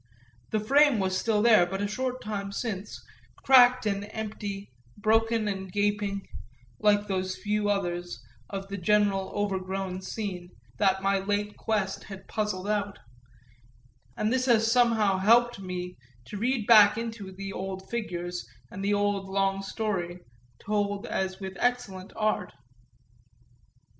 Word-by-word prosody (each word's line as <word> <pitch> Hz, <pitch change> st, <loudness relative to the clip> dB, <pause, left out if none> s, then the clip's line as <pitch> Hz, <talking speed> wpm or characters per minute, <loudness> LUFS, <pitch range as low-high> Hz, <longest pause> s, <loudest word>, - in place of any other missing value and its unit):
The 215 Hz, -, 0 dB
frame 275 Hz, +4 st, +4 dB
was 190 Hz, -2 st, 0 dB
still 210 Hz, +2 st, +1 dB
there 215 Hz, -7 st, +6 dB
but 195 Hz, +2 st, -4 dB
a 205 Hz, -, 0 dB
short 255 Hz, +4 st, -3 dB
time 200 Hz, -2 st, -4 dB
since, 205 Hz, -2 st, -5 dB, 0.4 s
cracked 255 Hz, -2 st, +6 dB
and 205 Hz, 0 st, -2 dB
empty, 205 Hz, -, -6 dB, 0.3 s
broken 225 Hz, +1 st, +2 dB
and 190 Hz, -2 st, -4 dB
gaping, 205 Hz, 0 st, -1 dB, 0.5 s
like 205 Hz, -1 st, +3 dB
those 185 Hz, -1 st, -2 dB
few 210 Hz, 0 st, -1 dB
others, 175 Hz, -7 st, -2 dB, 0.3 s
of 195 Hz, -1 st, -5 dB
the 200 Hz, 0 st, -5 dB
general 200 Hz, 0 st, +2 dB
overgrown 190 Hz, -2 st, -2 dB
scene, 185 Hz, -3 st, -5 dB, 0.3 s
that 190 Hz, -1 st, +2 dB
my 195 Hz, 0 st, +2 dB
late 205 Hz, +1 st, -2 dB
quest 205 Hz, -3 st, -2 dB
had 195 Hz, -1 st, -10 dB
puzzled 205 Hz, -3 st, -2 dB
out; 205 Hz, -1 st, -1 dB, 1.2 s
and 215 Hz, +3 st, +1 dB
this 260 Hz, 0 st, +1 dB
has 225 Hz, -2 st, +4 dB
somehow 225 Hz, -5 st, +3 dB
helped 235 Hz, +3 st, +4 dB
me 180 Hz, -1 st, -5 dB, 0.3 s
to 205 Hz, -, -7 dB
read 235 Hz, +1 st, 0 dB
back 210 Hz, -2 st, +7 dB
into 225 Hz, -3 st, -5 dB
it 190 Hz, 0 st, -11 dB
the 195 Hz, 0 st, -5 dB
old 190 Hz, 0 st, -5 dB
figures 175 Hz, -6 st, -4 dB, 0.2 s
and 195 Hz, -, -6 dB
the 205 Hz, +1 st, +2 dB
old 205 Hz, -1 st, 0 dB
long 195 Hz, 0 st, +1 dB
story, 190 Hz, -4 st, -3 dB, 0.4 s
told 205 Hz, -1 st, -1 dB
as 190 Hz, 0 st, -2 dB
with 190 Hz, -1 st, -6 dB
excellent 230 Hz, -7 st, -1 dB
art. 215 Hz, -1 st, -1 dB
205 Hz, 140 wpm, -28 LUFS, 190-215 Hz, 1.2 s, back